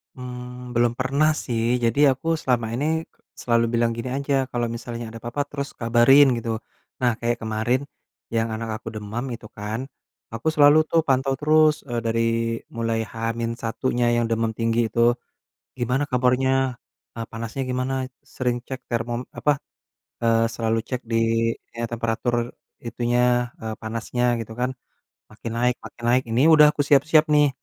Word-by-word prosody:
Mmm, 125 0 -8
belum 120 0 +3
pernah 140 +4 +2 0.2
sih. 115 -2 -1 0.2
Jadi, 115 +4 +1
aku 130 +5 -5
selama 120 -3 +1
ini 140 +4 -1 0.5
selalu 115 -1 +1
bilang 115 0 +2
gini 115 +2 -5
aja, 140 -1 0
"Kalau 120 -1 -2
misalnya 115 -1 -6
ada 115 - -9
apa-apa 120 +5 -2
terus 140 -1 -4
kabarin," 120 +4 +5
gitu. 115 -1 -2 0.5
Nah, 125 - +4
kayak 120 0 0
kemarin 110 +4 0 0.5
yang 115 0 +1
anak 110 0 -4
aku 115 - -15
demam 110 +5 -4
itu 110 -2 -13
kan, 105 +2 -4 0.5
aku 115 +6 -5
selalu 145 0 +7
tuh 165 0 +2
pantau 135 -1 +1
terus, 155 +2 +3
eee, 120 -3 -3
dari 115 0 0 0.5
mulai 115 -1 -1
H-1-nya 115 +1 -1
yang 120 0 +2
demam 115 0 0
tinggi 115 0 +1
itu. 120 +2 +2 0.6
Gimana 125 +4 +1
kabarnya, 130 +1 +2 0.4
eee, 115 -1 -4
panasnya 115 +4 -4
gimana, 130 +1 -2 0.4
sering 125 -1 0
cek 130 -1 -6
termom 120 +1 -1
apa, 150 -1 +1 0.7
eee, 115 0 +3
selalu 115 0 -1
cek 125 -1 -3
di, 115 - +1 0.6
kayak 115 0 -4
temperatur 120 +1 -1 0.3
itunya, 120 +1 +1
eee, 110 -1 -5
panasnya 120 +2 -1
gitu 115 -1 -6
kan. 125 +2 -1 0.6
Makin 110 +1 -7
naik 125 +1 +2
makin 120 - -11
naik, 125 +2 +3
ini 115 +5 +2
udah 150 -1 +8
aku 145 -1 -1
siap-siap 150 +2 +5
nih 150 -1 +5
120 Hz, 150 wpm, -23 LUFS, 115-130 Hz, 0.7 s, udah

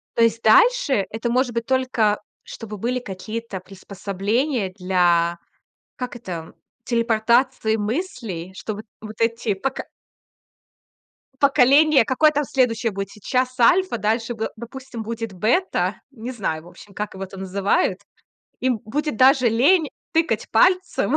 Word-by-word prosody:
То 230 - +4
есть 230 0 +2
дальше 270 - +4
это 225 +2 -3
может 245 0 +1
быть 230 0 -2
только, 250 -6 +1 0.2
чтобы 215 -2 -8
были 245 +5 -1
какие-то 215 0 -6
приспособления 200 +5 -2
для 175 -3 +2 0.6
как 250 -1 -5
это 175 -8 -7 0.3
телепортации 235 0 +2
мыслей, 220 - -4
что 215 - -5
вот 215 - -9 0.2
вот 215 0 -10
эти 230 -2 0
поко 260 +8 -3 1.6
поколения, 280 0 +5
какое 305 +6 +3
там 295 0 0
следующее 235 -4 +1
будет 195 0 -4
сейчас 255 +4 -2
Альфа, 360 +4 +4
дальше 225 +3 0
бэ 225 -1 -3
допустим, 240 0 -8
будет 225 -1 -5
Бета, 230 - 0
не 245 -1 -7
знаю, 165 -9 -3
в - - -15
общем, 180 +3 -15
как 210 -2 -4
его 190 +1 -6
там 190 0 -10
называют, 195 0 0 0.6
им 255 -3 +1
будет 290 +4 -2
даже 260 -1 +5
лень 290 +8 +3 0.2
тыкать 325 0 0
пальцем 370 0 +2
230 Hz, 135 wpm, -22 LUFS, 205-260 Hz, 1.6 s, поколения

